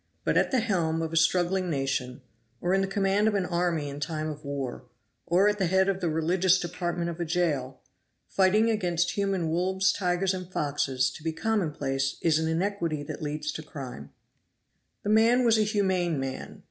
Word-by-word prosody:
But - - +1
at - - +3
the 260 -3 +2
helm 165 -7 0
of 160 0 -4
a - - -1
struggling 180 +3 +2
nation, 135 -3 -2 0.4
or 175 +1 0
in 195 - +3
the 195 - 0
command 195 +2 +1
of 215 - +1
an 195 -2 +1
army 170 -4 0
in 140 0 -6
time 155 +1 -3
of 150 +1 -10
war, 135 -3 -5 0.4
or 185 +4 +4
at 210 0 +1
the 190 - +2
head 190 +2 +3
of 195 -1 -1
the 175 - 0
religious 175 +4 +2
department 175 0 -3
of 170 - -9
a - - 0
jail, 155 -7 -1 0.5
fighting 210 +4 +3
against 175 -5 0
human 195 -5 -1
wolves, 190 +3 +1
tigers 180 0 0
and 185 -1 -6
foxes, 135 -4 0
to 155 - -11
be 160 - -1
commonplace 150 -9 -1
is 160 -2 +3
an 160 - -1
iniquity 165 -2 -1
and - - -6
leads 150 0 -3
to 155 - -6
crime. 125 - -8 0.9
The 205 - -2
man 230 +4 +4
was 225 -1 +4
a - - +4
humane 190 - +1
man. 135 0 -5
175 Hz, 190 wpm, -27 LUFS, 155-195 Hz, 0.9 s, or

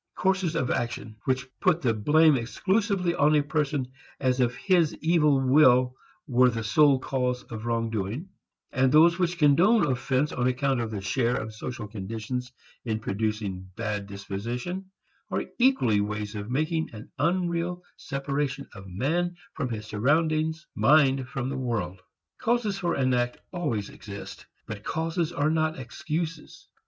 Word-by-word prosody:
Courses 190 -3 +1
of 130 -6 0
action 115 -2 -3
which 130 0 0
put 180 -3 +3
the 120 -3 +3
blame 150 +8 +4
exclusively 185 - 0
on 150 -1 +3
a 145 - +3
person 145 -3 -1 0.3
as 130 -1 +1
if 125 -1 +2
his 175 -5 +2
evil 155 -4 +3
will 130 -2 +5 0.3
were 125 -2 +4
the 115 -2 -3
sole 140 +6 +5
cause 125 -1 -1
of 110 0 -5
wrong 115 -1 0
doing 110 - -3 0.4
and 130 0 +2
those 170 +4 +6
which 175 -1 0
condone 175 +9 +5
offense 130 +2 0
on 125 0 0
account 130 +1 +1
of 115 - -3
the 105 -3 -4
share 120 +5 +1
of 110 -2 -4
social 110 0 -6
conditions 110 +5 -5 0.3
in 110 -3 -1
producing 105 -3 -3
bad 105 -3 -3
disposition, 120 - -5 0.4
are - - -1
equally 185 - +4
ways 105 0 -3
of 105 0 -6
making 155 +5 0
an 110 -1 -10
unreal 175 0 0
separation 140 0 -3
of 95 -3 -11
man 160 - -1 0.2
from 135 -5 -3
his 110 -2 -5
surroundings, 155 +8 +1
mind 135 +2 +4
from 130 -1 -3
the 135 0 -3
world. 105 -8 -3 0.4
Causes 230 -4 +1
for 175 -3 -1
an 130 -2 +1
act 120 0 0 0.2
always 140 - -2
exist, 100 -1 -9 0.2
but 105 -1 -7
causes 165 - -1
are 155 -2 +1
not 160 0 0
excuses. 155 +5 -5
130 Hz, 150 wpm, -27 LUFS, 115-160 Hz, 0.4 s, those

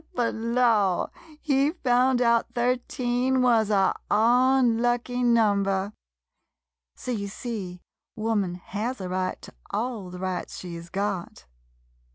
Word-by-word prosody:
But 240 -2 0
law 225 -5 +1
— - - -20
he 275 -1 +2
found 250 -4 +2
out 235 0 +2
thirteen 250 +1 0
wuz 230 -4 +3
a 195 -2 +3 0.2
unlucky 245 +1 +3
number! 205 -4 +2 1.0
So, 255 - -5
you 205 -4 -2
see, 195 -5 -6 0.3
wo 225 +1 -1
man 190 -5 0
has 215 +8 -4
a 185 - -4
right 185 0 -2
to - - -11 0.2
all 220 -4 -3
the 180 - -8
rights 185 -1 -4
she 175 -2 -7
's 170 0 -9
got. 195 -2 -3
230 Hz, 130 wpm, -26 LUFS, 195-245 Hz, 1.0 s, wuz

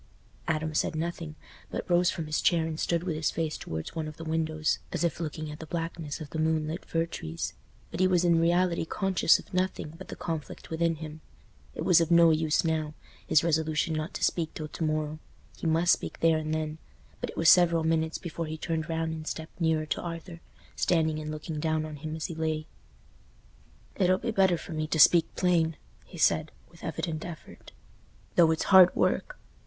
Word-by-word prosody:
Adam 155 0 -1
said 155 - 0
nothing, 165 -1 -4 0.3
but - - -4
rose 175 -1 +4
from 165 - -3
his 150 0 -1
chair 170 -2 +3
and 160 -1 -4
stood 170 -1 0
with 175 -4 -2
his 155 0 0
face 160 -1 -2
towards 80 0 -6
one 160 -2 -3
of 155 - -9
the 165 - -7
windows, 160 -1 0
as - - -2
if 170 -3 0
looking 155 -1 -4
at 150 - -9
the 160 - -8
blackness 165 -3 -4
of 155 -3 -8
the 160 - -3
moonlit 160 +1 0
fir 165 0 0
trees; 80 - -5 0.4
but 165 - -5
he 185 - +5
was 180 -1 +2
in 170 -1 +4
reality 175 +1 +2
conscious 190 0 +3
of - - -14
nothing 185 -4 -1
but 190 - -9
the - - -7
conflict 160 -2 -6
within 165 0 +1
him. 155 0 -8 0.5
It - - -3
was 175 -2 +6
of 165 - 0
no 170 -1 +7
use 155 +1 +1
now—his 155 -1 -1
resolution 160 -1 +1
not 155 +4 -3
to - - -4
speak 165 -3 0
till 155 - -5
to 165 - -5
morrow. 155 0 -1 0.4
He - - -4
must 165 +2 +3
speak - - -4
there 165 -1 +3
and 155 0 -4
then. 155 0 -2 0.4
But - - -4
it - - -9
was 165 - +2
several 170 -1 +6
minutes 160 0 +1
before 170 -2 -5
he 155 +1 -5
turned 160 -1 -3
round 160 0 -1
and 155 0 -7
stepped 160 +2 -6
nearer 160 -1 +2
to - - -2
Arthur, 170 0 -7 0.4
standing 160 -3 +1
and 155 0 -5
looking 155 0 -5
down 155 0 0
on 155 -1 -7
him 155 +2 -5
as 160 - -4
he 170 - -4
lay. 155 -1 -2 1.3
"It'll 185 0 +3
be 230 +4 -3
better 190 -4 +3
for 165 - -8
me 155 0 -2
to 160 - -1
speak 170 +2 +7
plain," 165 -3 +2 0.3
he 180 - -12
said, 160 -1 +3 0.2
with 170 - -17
evident 160 -1 -3
effort, 170 -3 -10 0.6
"though 170 -2 +5
it's 160 0 +1
hard 185 -1 +9
work. - - 0
160 Hz, 205 wpm, -28 LUFS, 155-170 Hz, 1.3 s, hard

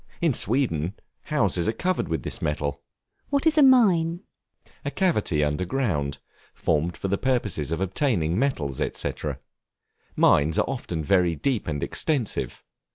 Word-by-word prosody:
In 165 -5 +2
Sweden, 105 - 0 0.3
houses 100 - +1
are - - 0
covered 180 - -1
with 80 -6 -2
this - - -4
metal. 70 -1 -2 0.5
What 280 +1 +1
is 320 -1 +4
a 305 - +5
Mine? 190 - +5 0.6
A 140 - -2
cavity 135 - +1
under 75 +4 0
ground, 85 - -1 0.4
formed 80 +2 0
for - - -3
the 100 +1 0
purpose 105 - 0
of 85 - -1
obtaining 95 - 0
metals, 85 - -1 0.2
&c. - - -2 1.0
mines 75 +2 +4
are - - +3
often 90 -12 -3
very 90 0 +3
deep 120 - -1
and 75 -3 -2
extensive. 140 -8 -1
100 Hz, 145 wpm, -25 LUFS, -, 1.0 s, a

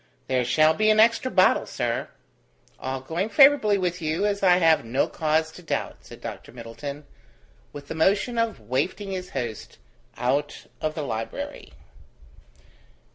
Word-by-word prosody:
"There 130 -1 +1
shall 155 +6 +4
be 215 +6 +2
an 215 0 +4
extra 230 +3 +4
bottle, 185 -5 +3
sir." 120 -1 -2 0.7
"All 130 0 -4
going 170 +10 -3
favourably 270 -7 +5
with 180 -1 -2
you, 160 +5 -1
as 200 -1 -1
I 180 -2 +5
have 165 -3 +4
no 115 +4 0
cause 160 0 0
to 180 - -13
doubt," 165 - -3
said - - -14
Dr - - -8
Middleton, 125 +5 -8 0.7
with 145 -1 -10
the - - -5
motion 195 +8 +1
of 230 - -1
wafting 140 - -2
his 185 -1 -5
host 120 -5 -6 0.4
out 140 +4 -1 0.2
of 155 0 -2
the 155 - -3
library. 115 -4 -5
160 Hz, 150 wpm, -25 LUFS, 130-195 Hz, 0.7 s, favourably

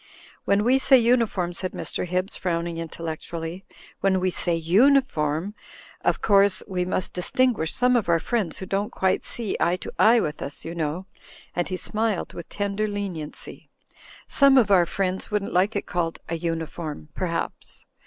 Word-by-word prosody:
"When 200 +1 +3
we 255 +4 +4
say 265 0 +6
uniform," 230 -7 +2
said 185 +1 -3
Mr. - - -3
Hibbs, 185 +2 -1
frown 170 -2 -1
ing 170 -1 -4
intellectually, 165 +2 -6 0.3
"when 190 -1 +2
we 185 0 +1
say 175 -1 0
uniform, 175 - +2 0.5
of - - +1
course 200 -2 +4
— - - -34
we 180 -2 -1
must 185 0 -2
distinguish 200 -1 +1
some 250 0 +3
of 225 -7 +1
our 165 -1 +4
friends 205 -3 -1
who 190 - -5
don't 200 +2 -1
quite 190 0 0
see 230 -4 -3
eye 175 - +2
to 175 - -7
eye 230 +2 +6
with 150 -7 -3
us, 140 - -6
you 165 - -5
know," 165 +2 -3 0.5
and 175 0 -1
he 185 - -2
smiled 215 0 -2
with 170 - -8
tender 205 +1 -1
leniency, 195 -7 -6 0.6
"some 275 -1 +5
of 225 -5 +4
our 180 -3 +5
friends 190 -1 -2
wouldn't 210 -1 -2
like 190 +5 +2
it 200 - -1
called 170 -2 -2
a 170 - -2
uniform 165 -2 -4
perhaps. 170 -3 -4
185 Hz, 175 wpm, -25 LUFS, 170-210 Hz, 0.6 s, say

